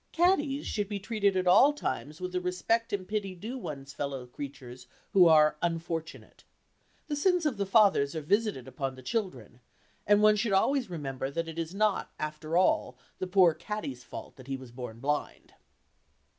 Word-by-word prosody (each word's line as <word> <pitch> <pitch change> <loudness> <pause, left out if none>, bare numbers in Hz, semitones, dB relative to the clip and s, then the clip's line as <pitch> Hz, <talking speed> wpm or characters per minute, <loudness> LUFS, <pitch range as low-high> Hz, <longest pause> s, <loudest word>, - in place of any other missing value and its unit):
Caddies 305 -5 +2
should 205 -2 -2
be 205 -1 -3
treated 200 -2 0
at 185 - 0
all 215 +11 +6
times 155 - -4
with 180 0 -4
the 180 0 -1
respect 180 +6 0
and 190 -2 -3
pity 200 -3 -3
due 220 +8 -6
one's 140 - -7
fellow 140 -3 -4
creatures 130 -1 -9 0.3
who 185 -3 +7
are 155 -1 +5
"unfortunate." 165 -1 -4 0.6
The 300 - -3
sins 355 +3 +2
of 275 -8 0
the 200 -1 -1
fathers 195 -9 +4
are 160 - -2
visited 200 - 0
upon 135 0 -4
the 130 - -13
children, 130 - -4 0.5
and 205 +1 +5
one 215 0 +6
should 210 -1 0
always 250 +4 +2
remember 135 -6 -4
that 165 +4 -3
it 165 0 -6
is 165 +3 -4
not, 210 -1 +1
after 155 +2 -3
all, 185 - +2 0.2
the 185 - -2
poor 180 -3 +5
caddy's 150 -12 -6
fault - - -9
that 130 -1 -13
he 135 -1 -3
was 130 -2 -12
born 120 -2 -8
blind. 145 +2 -3
180 Hz, 180 wpm, -29 LUFS, 140-210 Hz, 0.6 s, who